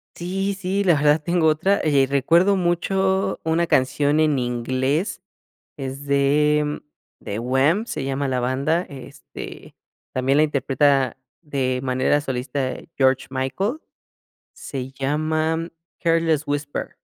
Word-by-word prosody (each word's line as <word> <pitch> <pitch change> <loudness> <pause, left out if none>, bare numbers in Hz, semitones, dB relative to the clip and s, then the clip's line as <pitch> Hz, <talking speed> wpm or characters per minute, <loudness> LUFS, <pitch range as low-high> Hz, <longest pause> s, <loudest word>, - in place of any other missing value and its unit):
Sí, 195 +3 -2
sí, 195 +1 -1
la 180 -3 +4
verdad 150 0 +3
tengo 170 -1 +2
otra, 175 +6 +2
eh, 140 -3 +3
recuerdo 165 +8 +3
mucho 190 +2 0
una 165 +1 +1
canción 145 +2 +2
en 155 -3 +3
inglés, 130 - -1 0.5
es 135 0 -6
de 150 +2 +2 0.4
The 100 - -4
Wham, 135 - +2
se 145 - -4
llama 135 +1 -1
la 130 -1 -1
banda, 135 +7 +1
este, 135 -2 -10 0.4
también 130 +1 +1
la - - +6
interpreta 140 -2 +2 0.3
de 135 -5 -1
manera 130 +2 +1
solista 130 -1 -3 0.2
George 130 -1 +2
Michael, 135 - -2 0.8
se 130 -2 -6
llama 155 +4 -1 0.3
Careless 165 -3 +2
Whisper. 145 0 -3
145 Hz, 120 wpm, -22 LUFS, 135-165 Hz, 0.8 s, la